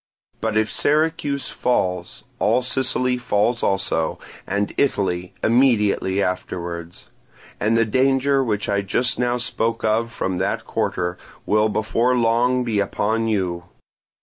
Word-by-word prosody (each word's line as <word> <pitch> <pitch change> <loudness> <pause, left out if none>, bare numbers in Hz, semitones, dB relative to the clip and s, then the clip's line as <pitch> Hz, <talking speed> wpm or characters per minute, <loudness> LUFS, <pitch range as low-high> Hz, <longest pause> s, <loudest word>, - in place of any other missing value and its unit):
But 110 -1 -1
if 110 0 +1
Syracuse 150 -2 0
falls, 90 -7 -1 0.2
all 125 - +2
Sicily 125 -1 +1
falls 120 +1 +1
also, 95 -5 0 0.3
and 100 +1 -1
Italy 90 -9 0
immediately 105 -5 +3
afterwards; 85 -2 -4 0.5
and 110 +2 +2
the 115 - +3
danger 135 +3 +2
which 105 -4 -1
I 100 0 +1
just 125 +5 0
now 125 0 +1
spoke 115 -1 -2
of 115 +2 +1
from 95 -5 -2
that 95 - -1
quarter 90 0 -2 0.3
will 105 +1 +2
before 115 +4 +1
long 120 +2 +2
be 110 -4 0
upon 110 +3 0
you. 90 -5 -1
110 Hz, 125 wpm, -22 LUFS, 95-125 Hz, 0.5 s, immediately